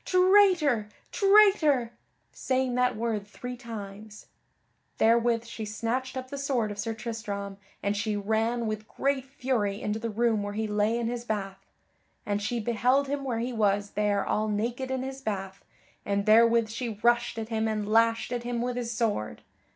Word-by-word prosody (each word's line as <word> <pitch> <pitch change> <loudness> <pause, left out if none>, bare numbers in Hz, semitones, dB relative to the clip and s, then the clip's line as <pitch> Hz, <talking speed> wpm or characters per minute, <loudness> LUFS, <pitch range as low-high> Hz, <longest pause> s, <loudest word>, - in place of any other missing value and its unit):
Traitor! 365 - +4 0.2
Traitor!" 390 - +4 0.4
saying 260 -1 -1
that 250 -1 +2
word 215 -2 -2
three 250 +4 -7
times. 215 -3 -9 0.7
Therewith 230 +1 +3
she 230 -1 -7
snatched 235 +5 -3
up 260 +1 -6
the 280 - -4
sword 255 -6 0
of 205 - -7
Sir 225 +2 -2
Tristram 210 -4 -5 0.3
and 200 0 0
she 210 +1 -1
ran 225 +3 0
with 215 0 -4
great 275 -1 -1
fury 250 -7 -1
into 210 +1 -2
the 230 +1 -3
room 225 0 +1
where 205 0 -4
he 220 +1 -2
lay 210 +2 +1
in 235 - -2
his 240 +1 -3
bath. 195 -4 -4 0.6
And 205 -1 -1
she 230 +3 -2
beheld 250 +5 +1
him 285 0 -2
where 250 -4 -2
he 240 +2 -2
was 205 -2 +1
there 205 -1 0
all 215 +1 0
naked 235 +5 -2
in 260 -1 -2
his 265 0 -6
bath, 195 -4 -4 0.4
and 200 0 -1
therewith 230 +1 +5
she 225 -1 -4
rushed 240 0 +2
at 220 0 -4
him 220 -1 0
and 215 -2 -2
lashed 230 +2 +2
at 240 - -2
him 240 0 -3
with 245 +1 -2
his 240 -1 -3
sword. 220 - -2
230 Hz, 175 wpm, -28 LUFS, 210-250 Hz, 0.7 s, therewith